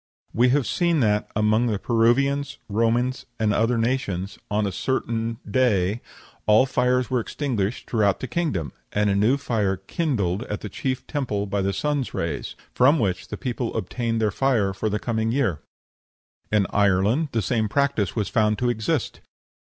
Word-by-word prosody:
We 125 +2 +4
have 135 0 +2
seen 170 -3 +1
that 105 -2 +1
among 110 +3 +2
the 110 -3 0
Peruvians, 140 +6 +1
Romans, 115 +4 0
and 110 -1 +2
other 115 +3 +2
nations, 100 -6 -1
on 105 +1 +1
a 100 - -1
certain 115 +2 -2
day 110 -5 +1 0.5
all 110 +4 +6
fires 125 -1 +1
were 125 - +2
extinguished 115 -4 -2
throughout 105 -4 +2
the 130 - -4
kingdom, 105 - -2 0.2
and 105 0 +1
a - - +1
new 110 +7 +3
fire 105 -8 0
kindled 100 - -1
at 105 - -5
the 105 - -6
chief 130 +6 -3
temple 120 -9 -2
by 100 0 -1
the 95 +1 0
sun's 145 +5 -2
rays, 80 -4 -3 0.2
from 140 +6 +5
which 95 -8 -1
the 105 - -6
people 120 +3 -3
obtained 115 +4 -2
their 110 -2 +1
fire 115 -6 +1
for 110 +3 -2
the 105 - 0
coming 110 0 -1
year. 115 - 0 0.9
In 105 -2 +3
Ireland 100 - +2
the 115 -2 0
same 110 +1 0
practice 140 -7 0
was 105 -3 0
found 105 -3 +2
to 125 +2 +1
exist. 120 +5 -2
115 Hz, 170 wpm, -24 LUFS, 100-130 Hz, 0.9 s, all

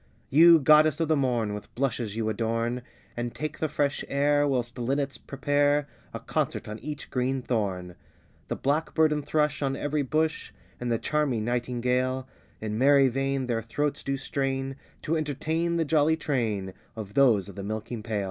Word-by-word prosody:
You 165 +4 +8
goddess 155 +1 +5
of 165 -1 0
the 160 - +4
morn, 120 -6 0
With 105 - -9
blushes 120 -5 -1
you 110 -1 -1
adorn, 115 +2 -1 0.3
And 120 0 -4
take 155 0 -4
the 155 - 0
fresh 145 -1 0
air, 145 +1 +2
whilst 125 -3 -2
linnets 135 +3 -1
prepare 145 +1 +1 0.2
A - - -5
concert - - -2
on 105 +1 -6
each 150 -1 -7
green 130 +1 -1
thorn; 95 -7 -2 0.5
The - - -2
blackbird 155 +2 +1
and 150 -1 -2
thrush 150 0 0
on 135 -1 0
every 145 +1 -1
bush, 155 +3 -1 0.3
And 125 -1 -2
the 115 - +2
charming 135 -6 0
nightingale, 125 +2 -1 0.3
In 110 0 -3
merry 140 0 +5
vein, 135 +1 -1
their 115 -2 -1
throats 145 +6 -2
do 135 0 -1
strain 135 0 -2 0.3
To 160 - 0
entertain, 160 +3 -1
the 165 - +1
jolly 155 +1 +3
train 110 -11 -1 0.2
Of 105 -3 -7
those 115 -8 +4
of 100 - -10
the 100 - -5
milking 110 +3 -4
pail. 110 -2 -2
135 Hz, 170 wpm, -27 LUFS, 115-145 Hz, 0.5 s, You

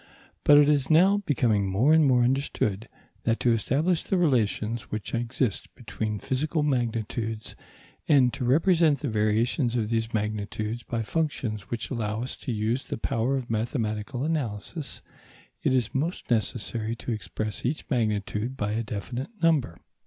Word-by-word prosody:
But 145 - +7
it 145 0 +7
is 145 -3 +2
now 185 +6 +6
becoming 110 -8 +2
more 120 +11 +4
and 160 0 +6
more 125 -4 +4
understood 120 -5 0 0.3
that 115 0 +1
to 120 - +4
establish 150 - +1
the 190 - -1
relations 120 - +1
which 110 -2 -5
exist 120 -2 -1
between 105 -1 -4
physical 150 - -1
magnitudes, 115 -4 -2 0.5
and 130 -5 +5
to - - -4
represent 160 +3 +3
the 145 - -1
variations 115 +4 +1
of 110 -3 0
these 115 0 0
magnitudes 105 +1 -2
by 115 0 -3
functions 110 - -2
which 120 +2 -4
allow 110 -2 -2
us 130 - -5
to - - -5
use 115 +4 -1
the - - -3
power 115 +4 0
of 125 -3 -5
mathematical 110 +1 -2
analysis, 145 - -3 0.6
it - - +1
is 125 -4 +1
most 155 +1 -2
necessary 115 0 -1
to 120 - -5
express 105 +1 -4
each 140 +5 -2
magnitude 110 +1 -1
by 105 -3 -1
a 110 +2 0
definite 120 +5 -5
number. 145 - +2
120 Hz, 155 wpm, -27 LUFS, 110-140 Hz, 0.6 s, But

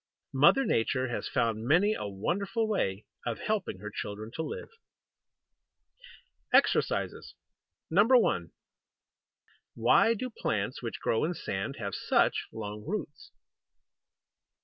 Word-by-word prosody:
Mother 150 - +5
Nature 130 +3 +1
has 120 - -3
found 115 -3 0
many 180 +9 +4
a 105 - -4
wonderful 200 - -1
way 105 - -1 0.2
of 120 -2 -2
helping 210 - -2
her 105 0 -6
children 105 +2 -6
to - - -3
live. 155 - -5 1.8
EXERCISES - - +2 0.5
1. 220 +9 +4 1.2
Why 230 - +4
do 255 +3 -4
plants 105 - -2
which 115 -2 -5
grow 115 - +1
in 175 +3 -1
sand 95 +1 -4
have 100 -3 -4
such - - +1
long 105 -1 -6
roots? 170 -4 -5
130 Hz, 110 wpm, -30 LUFS, -, 1.8 s, Mother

